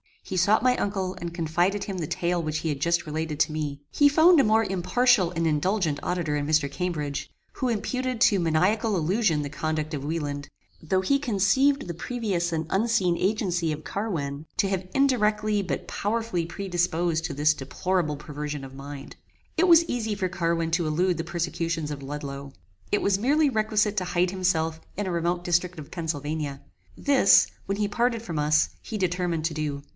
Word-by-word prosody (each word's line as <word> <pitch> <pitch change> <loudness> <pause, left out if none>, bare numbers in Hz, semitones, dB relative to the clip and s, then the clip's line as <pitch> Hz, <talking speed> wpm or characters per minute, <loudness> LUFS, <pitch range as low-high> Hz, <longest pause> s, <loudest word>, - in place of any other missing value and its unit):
He 185 - -4
sought 205 +6 +3
my 255 0 +3
uncle, 190 -2 -2
and 170 -1 -6
confided 175 +4 0
to - - -8
him 190 - -4
the 165 -4 -3
tale 175 +2 -1
which 155 -1 -2
he 160 - -2
had 145 -2 -2
just 170 +3 +1
related 155 -1 -3
to - - +2
me. 150 -2 -4
He 290 - +5
found 320 +4 +6
a - - +6
more 220 +1 +4
impartial 195 +2 +2
and 165 -1 -1
indulgent 160 0 +1
auditor 170 -5 -1
in 145 0 -2
Mr. 155 -2 +2
Cambridge, 150 -5 -3 0.2
who 260 - -2
imputed 250 +2 -2
to 205 -5 +5
maniacal 185 +7 +2
illusion 175 -1 +1
the 145 - -4
conduct 155 +1 -3
of 140 -2 -4
Wieland, 145 -2 -3 0.3
though 185 +4 +1
he 275 +9 +2
conceived 265 +4 +2
the 170 - -3
previous 180 -3 -2
and 160 0 -1
unseen 195 -4 +2
agency 180 -5 0
of 155 0 -5
Carwin, 155 -8 -3
to 195 - +2
have 190 -1 -2
indirectly 215 -6 +2
but 185 - -4
powerfully 220 -5 -1
predisposed 175 -2 -1
to 160 - -3
this 150 +2 +3
deplorable 150 +3 -1
perversion 150 -1 -6
of 135 -1 -9
mind. 140 +1 -9 0.4
It 360 +3 +4
was 335 -1 +7
easy 220 -7 -2
for 190 -2 -1
Carwin 165 -2 -1
to 165 -1 +1
elude 175 +3 +1
the 165 - -3
persecutions 170 -2 -2
of 145 -1 -6
Ludloe. 140 -1 -6 0.4
It 205 - +2
was 200 -1 +2
merely 290 +6 +3
requisite 215 -3 +1
to 185 - 0
hide 175 0 +1
himself 165 -4 0 0.2
in 205 - -2
a - - -1
remote 175 +1 -1
district 175 0 0
of 150 -2 -9
Pennsylvania. 150 -3 -3 0.4
This, 275 -8 +5 0.2
when 195 0 -2
he 210 -1 +1
parted 235 +2 0
from 170 -9 -4
us, 155 +1 +3
he 220 - -5
determined 180 -4 -1
to 165 - 0
do. 150 -2 -3
175 Hz, 185 wpm, -26 LUFS, 155-205 Hz, 0.4 s, was